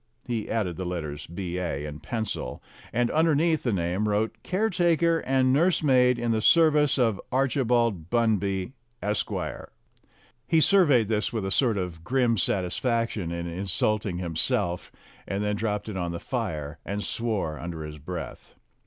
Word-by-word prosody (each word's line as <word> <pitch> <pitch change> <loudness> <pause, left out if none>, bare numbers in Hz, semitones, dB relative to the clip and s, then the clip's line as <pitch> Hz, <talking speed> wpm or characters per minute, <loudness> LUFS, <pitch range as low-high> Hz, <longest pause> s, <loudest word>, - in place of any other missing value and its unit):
He 115 -3 -3
added 95 -7 -1
the 95 - -3
letters 80 -5 -4
B.A., 85 -4 -3
in 75 0 -7
pencil, 110 +6 -4 0.3
and 120 +1 +1
under 160 0 +3
neath 160 +1 +2
the 120 - 0
name 95 +3 0
wrote 110 +2 0
"Caretaker 175 - +2
and 130 -2 +2
nursemaid 135 -6 +4
in 120 -1 -1
the 110 -1 +1
service 150 0 +5
of 115 -6 +1
Archibald 120 - +1
Bunby, 105 -4 +1 0.3
Esq." 105 0 -1 1.2
He 165 - +4
surveyed 150 - +5
this 105 0 0
with 110 -4 -2
a 95 - -2
sort 115 -1 +2
of 90 -3 -4
grim 120 0 +2
satisfaction 105 0 0
in 85 0 -3
insulting 95 +2 -1
him 85 -3 -4
self, 90 +2 -1 0.4
and 100 +1 -2
then 105 0 0
dropped 105 -1 -2
it 105 -3 -4
on 85 -2 -2
the 85 - -4
fire 75 0 -4
and 100 +1 -3
swore 105 -10 -2
under 85 -2 -5
his 75 0 -8
breath. 85 +3 -7
105 Hz, 155 wpm, -26 LUFS, 90-125 Hz, 1.2 s, service